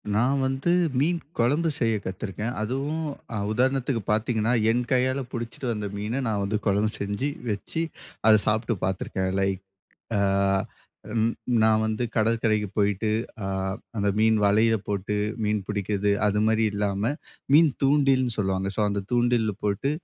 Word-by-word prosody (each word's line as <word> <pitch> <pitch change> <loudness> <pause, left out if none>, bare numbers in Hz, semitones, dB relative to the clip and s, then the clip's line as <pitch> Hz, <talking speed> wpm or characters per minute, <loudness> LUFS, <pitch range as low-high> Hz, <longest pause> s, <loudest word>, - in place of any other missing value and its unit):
நான் 135 +5 +2
வந்து, 135 +6 0 0.3
மீன் 170 +4 +2 0.2
குழம்பு 145 +8 +2
செய்ய 115 -2 +2
கத்துருக்கேன். 105 +5 -4
அதுவும் 140 +8 -2 0.3
அ - - -1
உதாரணத்துக்கு 130 0 +1
பாத்தீங்கன்னா, 110 +1 +1 0.2
என் 120 +1 0
கையால 130 +1 +2
புடிச்சுட்டு 120 +2 -5
வந்த 105 -2 -4
மீன, 110 +6 -2
நான் 105 -2 0
வந்து 105 +1 -1
குழம்பு 105 +2 +2
செஞ்சு, 100 +8 -1 0.2
வச்சி, 135 +10 -2 0.4
அத 110 - +8
சாப்பிட்டு 110 +1 +1
பார்த்துருக்கேன். 95 0 -2
லைக், 95 -1 0 0.6
அ - - +2 1.0
ம், 115 +1 +2 0.3
நான் 110 0 +4
வந்து 110 +2 -1
கடற்கரைக்கு 110 -1 +1
போயிட்டு, 105 +1 +1 0.3
அ - - -2 0.5
அந்த 100 0 +1
மீன் 110 0 +4
வலையில 110 +3 +4
போட்டு 100 +1 -2 0.3
மீன் 105 -1 +1
புடிக்குறது, 100 0 0
அது 105 0 +2
மாரி 110 0 +2
இல்லாம, 100 +3 0 0.4
மீன் 160 0 +7
தூண்டில்னு 135 -3 +3
சொல்லுவாங்க. 95 -1 0
ஸோ, - - -3
அந்த 100 0 -1
தூண்டில்ல 120 -3 +2
போட்டு 105 +7 0
110 Hz, 140 wpm, -25 LUFS, 105-125 Hz, 1.0 s, அத